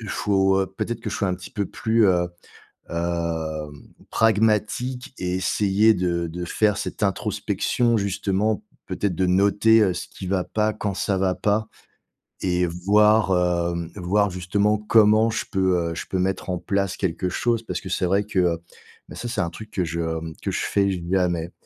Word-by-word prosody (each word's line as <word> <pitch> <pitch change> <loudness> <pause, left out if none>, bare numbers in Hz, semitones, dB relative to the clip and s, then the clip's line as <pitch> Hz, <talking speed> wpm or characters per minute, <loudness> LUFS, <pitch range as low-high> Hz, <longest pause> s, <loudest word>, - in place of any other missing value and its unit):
il 110 - -8
faut, 95 -1 +2
heu, 95 - 0
peut-être 115 +5 -4
que 110 -2 -4
je - - -3
sois 100 - 0
un 90 - 0
petit 90 0 -10
peu 105 -6 -2
plus, 110 +2 +2
heu, 90 -2 +3 0.6
hem, 85 -3 -2 0.4
pragmatique 110 +4 +1
et 90 0 -2
essayer 105 +3 +3
de 85 -2 -1
de 90 +2 -5
faire 105 +3 +1
cette - - -3
introspection 115 +4 0
justement 100 +1 0 0.2
peut-être 100 -3 -2
de 95 +2 +1
noter, 100 +4 +4
heu, 95 -3 +3
ce 90 - -6
qui 95 - -9
va 95 0 0
pas 110 +3 0
quand 105 -2 -3
ça 95 +1 -1
va 95 -1 +1
pas 105 +1 0 0.8
et 90 -1 +1
voir, 105 +5 +3 0.5
hem, 85 -1 -5
voir 100 +2 +1
justement, 100 +4 +1
comment 110 +1 +4
je 110 - -2
peux, 95 -3 +2
heu, - - -5
je - - -5
peux 95 - -2
mettre 95 +1 -1
en 90 - 0
place 100 +1 -1
quelque 90 -1 -1
chose 115 +4 0
parce - - -4
que 95 - -9
c'est 95 - 0
vrai 100 +3 +2
que, 100 -2 -2
heu, 85 -2 +2 0.5
bah, - - -9
ça, 120 - -5
c'est 115 -4 -1
un 85 -1 -2
truc 110 +4 -10
que 90 -4 -1
je, 85 +1 -4
hem, 80 -1 -3
que - - -2
je - - -2
fais 100 -1 +1 0.2
jamais. 85 -3 0
95 Hz, 190 wpm, -23 LUFS, 90-105 Hz, 0.8 s, noter